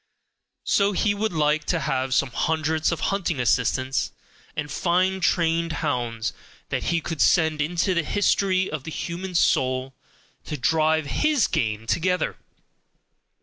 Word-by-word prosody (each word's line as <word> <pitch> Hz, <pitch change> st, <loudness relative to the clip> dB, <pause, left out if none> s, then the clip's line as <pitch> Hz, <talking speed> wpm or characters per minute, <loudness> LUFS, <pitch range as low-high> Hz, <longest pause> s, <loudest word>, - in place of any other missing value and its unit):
So 200 Hz, 0 st, +2 dB
he 205 Hz, +2 st, +2 dB
would 215 Hz, +1 st, -1 dB
like 155 Hz, -1 st, +1 dB
to 170 Hz, -, 0 dB
have 130 Hz, 0 st, -1 dB
some 135 Hz, -1 st, +1 dB
hundreds 160 Hz, +4 st, 0 dB
of 170 Hz, -, -2 dB
hunting 175 Hz, -7 st, -1 dB
assistants, 130 Hz, +2 st, +1 dB, 0.4 s
and 150 Hz, -1 st, -4 dB
fine 185 Hz, +4 st, +1 dB
trained 165 Hz, -1 st, +1 dB
hounds, 120 Hz, -8 st, -2 dB, 0.4 s
that -, -, -2 dB
he 170 Hz, -1 st, +1 dB
could 160 Hz, -1 st, -4 dB
send 160 Hz, -3 st, +3 dB
into 175 Hz, +5 st, 0 dB
the 170 Hz, -, +2 dB
history 190 Hz, +1 st, +1 dB
of 150 Hz, -3 st, -5 dB
the 160 Hz, -, -6 dB
human 175 Hz, +3 st, -5 dB
soul, 130 Hz, -4 st, +1 dB, 0.5 s
to 150 Hz, -, -4 dB
drive 155 Hz, +4 st, +2 dB
HIS 300 Hz, -, +2 dB
game 110 Hz, -1 st, -1 dB
together. 180 Hz, +8 st, 0 dB
160 Hz, 140 wpm, -24 LUFS, 135-180 Hz, 0.5 s, send